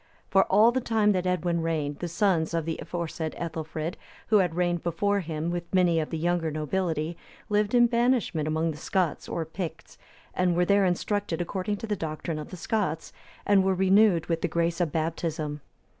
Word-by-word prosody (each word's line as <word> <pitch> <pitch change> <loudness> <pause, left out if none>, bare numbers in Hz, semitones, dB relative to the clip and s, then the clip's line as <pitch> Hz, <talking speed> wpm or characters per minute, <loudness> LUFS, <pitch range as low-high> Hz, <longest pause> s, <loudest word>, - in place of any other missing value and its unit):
For 195 - +5
all 215 +4 +5
the 260 +1 -1
time 220 -3 +2
that 185 -2 0
Edwin 175 -2 0
reigned, 155 -3 -2
the 175 - -3
sons 170 -2 +1
of 165 -2 -1
the 165 -1 -3
aforesaid 165 -2 -4
Ethelfrid, 160 +1 -4 0.3
who 215 - +6
had 175 -4 +1
reigned 175 -1 0
before 200 +4 0
him, 160 -1 -3
with 175 -1 -5
many 180 -3 +3
of 155 - -2
the 165 - -3
younger 170 0 0
nobility, 160 +1 -2 0.3
lived 210 +2 +1
in 240 0 +7
banishment 235 - +1
among 160 +1 0
the 150 - -8
Scots 175 0 -1
or 165 - -2
Picts, 160 0 -7 0.3
and 180 -1 +1
were 175 +1 +3
there 200 +1 +4
instructed 185 0 -1
according 185 +3 -2
to 225 - -6
the 210 -2 -1
doctrine 155 -2 -4
of 150 - -7
the 185 - -8
Scots, 170 -4 -2 0.3
and 200 -2 +4
were 190 0 +2
renewed 190 -2 +4
with 165 0 -1
the - - +1
grace 170 +1 0
of 165 -4 0
Baptism. 155 -2 -2
175 Hz, 190 wpm, -27 LUFS, 160-195 Hz, 0.3 s, in